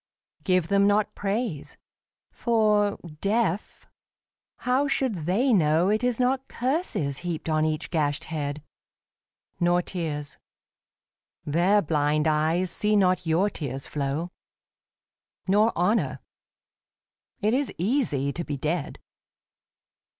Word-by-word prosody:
Give 185 -4 +2
them 200 +2 +3
not 205 +1 +2
praise. 205 - -3 0.5
For, 210 -3 +2 0.2
deaf, 205 -1 -1 0.8
how 260 +3 +2
should 260 -2 +1
they 195 - +1
know 165 -1 +3
It 215 +3 +1
is 245 -1 +1
not 260 +1 +1
curses 245 - -1
heaped 175 -3 -4
on 155 -1 +2
each 155 0 -2
gashed 145 -4 0
head? 150 -2 -4 1.0
Nor 175 0 +2
tears. 150 -6 -5 1.1
Their 180 +7 +3
blind 150 0 +1
eyes 160 +4 +1
see 210 0 +1
not 185 -3 +2
your 180 +6 +2
tears 135 -3 -4
flow. 150 +4 -3 1.2
Nor 210 +4 +4
honour. 175 - +1 1.2
It 215 +2 +1
is 275 +2 0
easy 170 - 0
to 170 - -3
be 145 -3 -4
dead. 155 +2 -2
180 Hz, 110 wpm, -26 LUFS, 155-215 Hz, 1.2 s, Nor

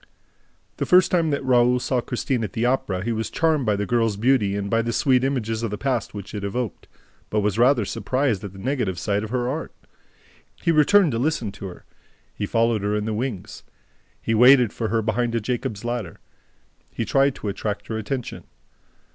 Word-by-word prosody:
The - - -2
first 180 0 +5
time 170 -3 +2
that 140 -2 -2
Raoul 125 -1 +4
saw 125 0 0
Christine 125 0 -2
at 105 - -5
the 115 - 0
Opera, 100 -7 0
he 120 - -1
was 110 0 -2
charmed 155 -6 +1
by 105 - +3
the 105 +1 -2
girl's 115 -2 +1
beauty 110 -3 +2
and 100 0 -2
by 115 +2 +2
the 115 +1 -2
sweet 130 +1 +2
images 115 -5 -1
of 115 - -2
the 105 - -4
past 125 -4 -2
which 100 -2 -8
it 105 -2 -5
evoked, 110 +2 -4 0.4
but 105 - +1
was 105 +1 0
rather 125 -2 +4
surprised 115 +1 -1
at 100 - -6
the 95 - -14
negative 115 -4 -2
side 100 +3 -1
of 110 - -5
her 125 0 -1
art. 150 +5 -3 0.9
He 170 - +1
returned 165 +3 +5
to 115 - -1
listen 125 -6 -1
to 100 0 -8
her. 90 - -11 0.5
He 105 - -4
followed 115 -1 +1
her 105 +1 0
in 105 0 -1
the 110 - -2
wings. 110 -3 -4 0.6
He 115 - -2
waited 125 0 +6
for 115 - -2
her 110 +1 0
behind 115 +2 0
a - - +2
Jacob's 115 -2 -3
ladder. 120 -8 -4 0.7
He 115 - -4
tried 135 +4 +2
to - - -6
attract 100 0 -3
her 110 -1 -4
attention. 120 +3 -5
115 Hz, 205 wpm, -23 LUFS, 105-130 Hz, 0.9 s, waited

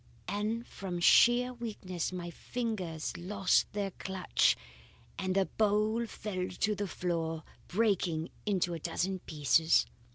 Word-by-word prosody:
And 210 +4 -1
from 180 -3 -5
sheer 240 +7 +6
weakness 205 -8 -4
my 175 -1 -5
fingers 185 -8 -3
lost 190 +1 +1
their 200 -1 -2
clutch, 190 0 +1 0.6
and 185 0 -1
the 195 -1 +4
bowl 215 +3 +1
fell 185 -4 -4
to 210 - 0
the 205 0 -3
floor, 165 -3 -2 0.2
breaking 180 -6 +1
into 185 -4 0
a 165 - -4
dozen 185 +4 -2
pieces. 160 +1 +3
190 Hz, 125 wpm, -32 LUFS, 175-210 Hz, 0.6 s, sheer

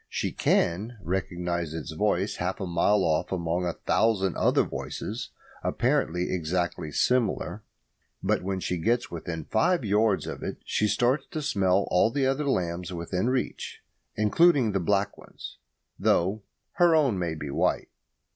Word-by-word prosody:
She - - -2
can 105 +8 +1
recognise 85 -3 -2
its 80 - -5
voice 100 +3 0
half 90 +3 -2
a 95 - -2
mile 90 +4 +2
off 80 -2 0
among 90 0 -1
a 85 - -1
thousand 100 -5 +2
other - - +3
voices - - -5 0.3
apparently 90 +3 0
exactly 85 -1 -2
similar; 120 - 0 0.6
but - - +1
when 95 +1 -2
she 90 -1 -2
gets 120 +7 0
within 80 -1 -5
five 130 +6 +1
yards 105 0 +2
of - - -6
it - - -4
she 105 - +1
starts 120 +7 +1
to 155 - -4
smell 100 -7 +2
all 90 +5 +4
the 135 +2 0
other 135 +2 0
lambs 90 -5 -1
within 90 +5 -2
reach, 130 -1 -3 0.3
including 125 +3 +4
the 95 - 0
black 100 +3 0
ones - - -11 0.4
though 95 +5 +2 0.4
her 175 -2 +5
own 135 -11 +2
may 85 -2 -2
be 75 -2 -6
white. - - 0
95 Hz, 150 wpm, -27 LUFS, 85-115 Hz, 0.6 s, her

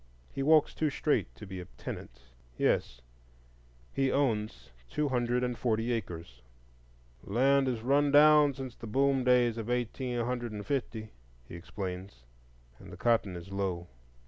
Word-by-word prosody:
He 135 - -3
walks 155 +1 +4
too 155 - 0
straight 150 +1 0
to 105 - -10
be 95 -1 -7
a 90 - -7
tenant,—yes, - - -4 0.9
he 135 -1 +1
owns 105 - -1 0.2
two 150 - -1
hundred 125 -1 0
and 125 -1 -1
forty 115 0 0
acres. 85 - -6 0.8
"The 100 - -8
land 135 +3 +4
is 120 -3 -1
run 140 +3 +3
down 150 -1 +6
since 130 -2 -7
the 115 - -9
boom 135 +3 +2
days 120 -2 +3
of 115 +1 -5
eighteen 125 +1 -2
hundred 120 -2 -3
and 105 -1 -6
fifty," 115 -6 -3 0.4
he - - -11
explains, 90 - -7 0.6
and - - -11
cotton 115 -6 +1
is 90 +2 -9
low. 95 -3 -3
120 Hz, 145 wpm, -30 LUFS, 95-135 Hz, 0.9 s, down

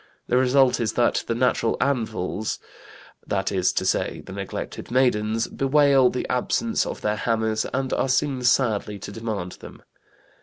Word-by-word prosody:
The 125 - +3
result 130 0 +4
is 115 -2 -1
that 120 -1 +2
"the 115 - 0
natural 120 -2 +1
anvils," 110 -6 -1 0.7
that 95 -1 -1
is 95 -2 +2
to - - -1
say - - 0
the - - -9
neglected - - -6
maidens, 115 -3 +1
"bewail 135 -2 +4
the 125 - -3
absence 225 - 0
of - - -6
their 105 0 0
hammers 110 -1 0
and 130 +1 -1
are 135 - 0
seen 135 0 +1
sadly 115 -4 +1
to 100 - -8
demand 105 -5 -4
them." - - -12
120 Hz, 155 wpm, -24 LUFS, 110-130 Hz, 0.7 s, result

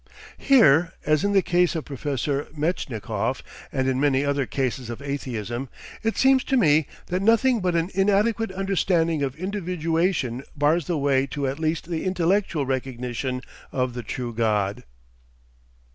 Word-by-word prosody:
Here, 175 - +5
as 155 +2 +2
in 200 - +1
the 195 -2 +4
case 175 0 +2
of 160 - -3
Professor 140 0 -2
Metchnikoff, 120 - -2 0.3
and 130 -1 0
in 130 -1 +1
many 140 -1 +2
other 140 -2 0
cases 125 +1 -2
of 120 - -5
atheism, 130 -3 -4 0.3
it 225 0 -1
seems 265 0 +4
to 270 - +1
me 155 - +4 0.2
that 180 +1 -2
nothing 230 +3 +4
but 180 -2 0
an 170 +3 0
inadequate 205 +3 +2
understanding 180 -4 +1
of 135 -2 -1
individuation 170 - -1
bars 150 +3 +2
the 175 - 0
way 140 -1 +2
to 140 +1 -3
at 135 +3 -2
least 160 0 -1
the 165 -2 -3
intellectual 185 -4 +1
recognition 125 -1 -3 0.3
of 125 -2 -1
the 120 - -4
true 120 +1 -5
God. 105 -5 0
145 Hz, 150 wpm, -24 LUFS, 130-180 Hz, 0.3 s, Here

